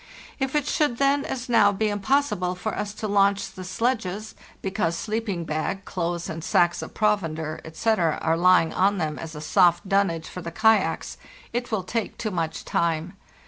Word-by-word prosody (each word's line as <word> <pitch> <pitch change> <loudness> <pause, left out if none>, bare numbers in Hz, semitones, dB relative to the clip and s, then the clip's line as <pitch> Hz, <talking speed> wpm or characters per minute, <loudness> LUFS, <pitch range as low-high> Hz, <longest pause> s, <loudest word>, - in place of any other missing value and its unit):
If 270 +1 -1
it 295 -2 +2
should 295 -5 +1
then, 280 +1 +3
as 255 -1 -4
now, 220 -4 +5
be 215 +2 0
impossible 205 -4 0
for 210 +4 -3
us 205 - -3
to 215 0 -4
launch 200 -1 +2
the 185 -1 -9
sledges, 215 0 -2 0.3
because 190 -4 -1
sleeping 210 -5 -2
bag, 155 +5 -3
clothes, 170 -1 -3
and 165 0 -5
sacks 175 +1 +2
of - - -8
provender, 165 -7 0
etc., 165 0 0
are 160 - +1
lying 175 -1 +4
on 200 +2 +2
them 155 -4 -2
as 160 -1 -7
a 150 - -6
soft 175 +4 +3
dunnage 190 -5 +1
for 180 - -7
the 170 - -5
kayaks, 220 +5 +2 0.4
it 245 +1 -2
will 210 -4 0
take 220 +3 -3
too 215 - -3
much 165 -3 -3
time. 165 +1 0
195 Hz, 180 wpm, -25 LUFS, 170-220 Hz, 0.4 s, now